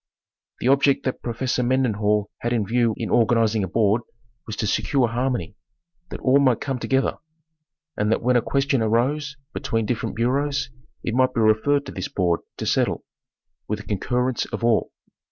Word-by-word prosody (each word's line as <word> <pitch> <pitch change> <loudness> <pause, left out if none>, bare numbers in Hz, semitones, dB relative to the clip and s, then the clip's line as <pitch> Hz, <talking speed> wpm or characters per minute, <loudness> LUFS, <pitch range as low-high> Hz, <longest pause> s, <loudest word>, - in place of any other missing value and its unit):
The - - 0
object 140 +1 +3
that 130 - -2
Professor 125 +2 -1
Mendenhall 105 -5 +1
had 120 +1 -1
in 110 -4 +1
view 115 0 +1
in - - -3
organiz 115 -1 +3
ing 105 - +1
a - - -1
board 110 +3 +2 0.5
was 110 - -4
to 110 - -2
secure 125 +4 +1
harmony; 120 -3 -2 0.5
that - - -6
all 135 +2 +4
might 130 -5 +3
come 135 -2 -3
together; 135 +2 0 0.8
and 105 +1 0
that 115 - +1
when 125 +1 +3
a 120 - +4
question 135 +1 +1
arose 135 +6 0 0.2
between 115 -1 -1
different 110 -1 -2
bureaus 135 +3 0 0.3
it 115 - -2
might 130 +1 +2
be 115 - +2
referred 110 +7 +3
to - - -7
this 95 - -4
board 90 -3 0 0.2
to - - -4
settle, - - 0 0.6
with - - -1
the - - -11
concurrence 125 +5 -1
of - - -6
all. 115 -2 +2
120 Hz, 175 wpm, -23 LUFS, 110-130 Hz, 0.8 s, all